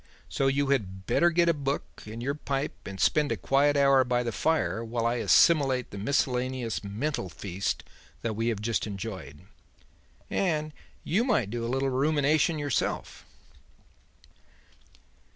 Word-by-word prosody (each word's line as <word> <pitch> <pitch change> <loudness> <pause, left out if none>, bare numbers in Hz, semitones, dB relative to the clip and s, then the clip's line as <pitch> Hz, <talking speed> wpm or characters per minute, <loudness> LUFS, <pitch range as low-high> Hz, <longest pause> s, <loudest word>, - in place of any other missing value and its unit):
So 135 - 0
you 140 +1 +1
had 95 -8 -1
better 175 - +3
get 170 0 +2
a 170 - +4
book 140 -1 -2 0.2
and 115 +2 -6
your 140 +2 0
pipe 140 -1 -4
and 95 -1 -7
spend 150 +7 +2
a - - 0
quiet 145 +1 +2
hour 140 -1 +5
by 125 0 0
the 120 - -2
fire 115 -1 0
while 115 0 -2
I 120 +1 +1
assimilate 135 -2 +4
the 100 - -7
miscellaneous 125 -1 -1
mental 105 +2 -3
feast 90 +4 -3 0.4
that 115 -2 -2
we 115 +2 -1
have 110 -3 -2
just 115 0 0
enjoyed. 100 -6 -7 0.9
And 155 -5 -1 0.3
you 200 +8 +1
might 125 - +1
do 120 0 -3
a 115 - -2
little 135 +1 0
rumination 150 +4 +2
yourself." 145 -3 -2
130 Hz, 150 wpm, -28 LUFS, 115-145 Hz, 0.9 s, hour